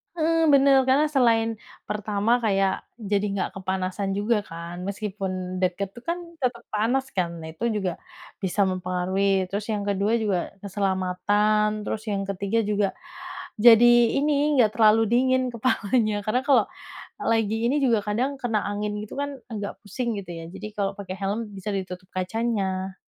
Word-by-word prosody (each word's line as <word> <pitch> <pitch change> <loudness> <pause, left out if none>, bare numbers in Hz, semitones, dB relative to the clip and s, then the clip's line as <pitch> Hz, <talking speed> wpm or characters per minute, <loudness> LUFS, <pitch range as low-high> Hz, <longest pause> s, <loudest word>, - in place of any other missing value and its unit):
Heeh, 325 0 +2
bener. 275 -2 +5
Karena 295 +3 +3
selain 225 -4 +2 0.2
pertama 210 +3 0
kayak 195 -4 0
jadi 205 -3 -1
nggak 190 - -1
kepanasan 190 +1 -2
juga 210 +2 +1
kan 170 +1 -7
meskipun 190 -3 -4
deket 190 +1 -1
tuh 240 - -12
kan 340 - +1 0.2
tetep 245 -3 -1
panas 245 +5 0
kan? 180 -3 0
Nah, 160 - -7
itu 225 +9 -2
juga 190 -4 0 0.5
bisa 195 +1 +1
mempengaruhi. 185 +1 0
Terus 205 +2 -3
yang 210 -2 -1
ke-2 200 +2 +1
juga 210 -5 +1 0.3
keselamatan, 205 +2 +1
terus 215 - -3
yang 200 -1 -1
ke-3 200 +3 -1
juga 205 -1 +1 0.7
jadi 235 +1 +8 0.3
ini, 295 +1 +2
nggak 215 - +3
terlalu 220 0 +6
dingin 255 +1 +3
kepalanya 220 -2 0
karena 220 +4 +1
kalau 280 - +5 0.7
lagi 220 -1 +2
ini 280 +3 +1
juga 230 -4 +4
kadang 255 +7 -1
kena 225 -3 0
angin 210 0 -2
gitu 210 - -8
kan 285 0 -1 0.2
agak 205 -3 -4
pusing 235 +3 -3
gitu 190 -3 -8
ya, 165 - -7
jadi - - -7
kalau 200 -1 0
pakai 190 -2 -6
helm 210 +3 -2
bisa 200 +1 -6
ditutup 185 -1 -5
kacanya. 190 -1 -1
210 Hz, 155 wpm, -25 LUFS, 195-235 Hz, 0.7 s, jadi